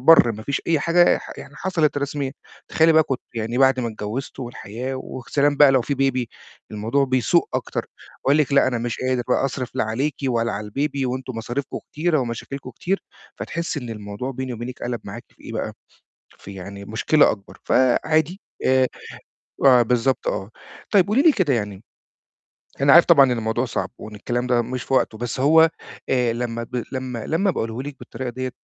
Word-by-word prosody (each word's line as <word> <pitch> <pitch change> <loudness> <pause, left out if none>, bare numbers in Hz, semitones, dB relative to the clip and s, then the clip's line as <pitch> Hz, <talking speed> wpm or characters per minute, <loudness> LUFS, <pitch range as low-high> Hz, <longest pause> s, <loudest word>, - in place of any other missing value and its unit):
البَر، 130 -4 +7
ما 110 0 -8
فيش 140 +4 -2
أي 165 -2 +3
حاجة 175 +3 +4
ح - - -10
يعني - - -11
حصلِت 165 -6 0
رسميًا، 140 -1 -3 0.4
تخيّلي 160 +1 +4
بقى 160 - +6
كنتِ 135 -4 -3
يعني 115 +2 -2
بعد 135 -1 +4
ما 120 - -1
اتجوّزتوا، 110 +5 -5
والحياة 120 +2 -6
وسلام 140 +3 -1
بقى 145 -2 +7
لو 130 -2 +3
فيه 140 - -2 0.2
Baby، 130 -1 -2 0.5
الموضوع 110 +6 0
بيسوء 130 -4 +2
أكتر، - - -2 0.4
يقول 140 +2 +4
لِك: 150 -2 +1
"لا 140 - +5
أنا 125 -2 0
مش 120 0 -3
قادر 130 -1 0
بقى - - +2
أصرف 130 -2 -3
لا - - +1
عليكِ 130 +7 -1
ولا 115 -1 0
على 105 +1 -5
الbaby، 140 +2 -1
وأنتم 130 -1 -4
مصارفكم 120 +5 -4
كتيرة 155 +1 +1
ومشاكلكم 130 +2 -5
كتير،" 190 +11 -2 0.3
فتحسّي 170 -3 -3
إن 120 -2 -7
الموضوع 105 +3 -5
بيني 130 -1 -4
وبينِك 120 +2 -7
قلَب 120 -1 -3
معاكِ - - -8
في - - -23
إيه - - -7
بقى، - - -3 0.7
في 100 - -10
يعني 100 +1 -8
مشكلة 125 +8 +3
أكبر، 100 -2 -8
فعادي، 155 +8 +2 0.3
آآ، 130 0 +4 1.0
بالضبط 125 +2 0
آه، 95 +2 -2 0.4
طيب 195 -3 +5
قولي 220 +6 +3
لي 320 +1 +7
كده 185 - +1
يعني، 105 -3 -3 1.0
أنا 140 0 +6
عارف 170 - +8
طبعًا 145 -5 +7
إن 130 - 0
الموضوع 110 +3 -1
صعب، 120 - -3
وإن 110 0 -9
الكلام 120 +4 -2
ده 120 -1 +3
مش 125 +1 -4
في 135 - -4
وقته، 115 -4 +2
بس 120 +2 -4
هو، 160 +4 +6 0.4
آآ، 125 -3 +2
لمّا 115 -1 -3
ب 125 0 -4
لمّا 130 -4 -4
لمّا 190 +5 +1
باقوله 115 -5 -3
لِك 145 -1 -7
بالطريقة 130 -1 -6
ديَّة 130 +1 -4
130 Hz, 185 wpm, -22 LUFS, 115-145 Hz, 1.0 s, عارف